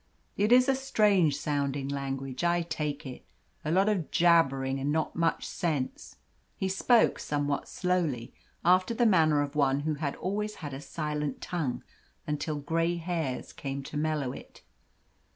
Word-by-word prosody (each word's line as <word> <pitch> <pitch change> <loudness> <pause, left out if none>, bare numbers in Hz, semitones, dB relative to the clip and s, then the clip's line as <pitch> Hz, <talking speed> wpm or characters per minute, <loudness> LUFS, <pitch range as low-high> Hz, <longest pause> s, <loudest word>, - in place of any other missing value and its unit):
It 210 +3 +1
is 250 +1 +7
a 270 - +4
strange 205 - +3
sounding 140 -2 -1
language, 135 0 -4
I 175 0 +2
take 150 -3 -3
it 130 -2 -8 0.4
a 155 - -3
lot 190 +5 +3
of 195 -7 0
jabbering 135 -6 +3
and 140 +2 -1
not 160 +1 -1
much 165 0 0
sense." 150 -7 -3 0.4
He 190 - -1
spoke 225 +5 +3
somewhat 145 -1 -1
slowly, 170 -10 -1 0.3
after 185 +5 +4
the 240 - +3
manner 160 -8 +4
of 145 +1 -6
one 140 -1 +2
who 155 +1 -1
had 140 -3 -1
always 210 +3 -3
had 145 -4 -7
a 135 - -6
silent 150 -2 -3
tongue 155 -9 -3 0.4
until 150 +1 -2
grey 165 +4 0
hairs 165 -6 -3
came 140 0 -5
to 145 - -9
mellow 150 -3 0
it. - - -12
155 Hz, 155 wpm, -29 LUFS, 140-180 Hz, 0.4 s, is